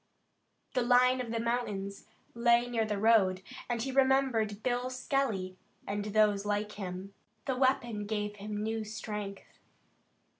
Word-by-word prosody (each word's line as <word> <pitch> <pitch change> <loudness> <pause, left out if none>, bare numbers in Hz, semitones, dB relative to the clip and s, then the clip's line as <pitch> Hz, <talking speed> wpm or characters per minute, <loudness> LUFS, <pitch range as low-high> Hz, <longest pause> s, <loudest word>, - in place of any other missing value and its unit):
The 255 - +2
line 250 +1 +4
of 240 - -5
the 230 0 -1
mountains 210 -4 -2 0.3
lay 235 0 +4
near 230 -2 0
the 210 -1 -2
road, 195 -4 +4 0.3
and 235 -2 -1
he 270 - -2
remembered 260 -6 +2
Bill 250 0 0
Skelly 255 -8 -1 0.3
and 205 0 -3
those 210 -1 +3
like 210 0 -1
him. 190 -1 -6 0.3
The 265 - 0
weapon 240 -5 +1
gave 210 -1 -2
him 210 +1 -4
new 220 0 -2
strength. 210 -2 -6
220 Hz, 140 wpm, -31 LUFS, 205-245 Hz, 0.3 s, line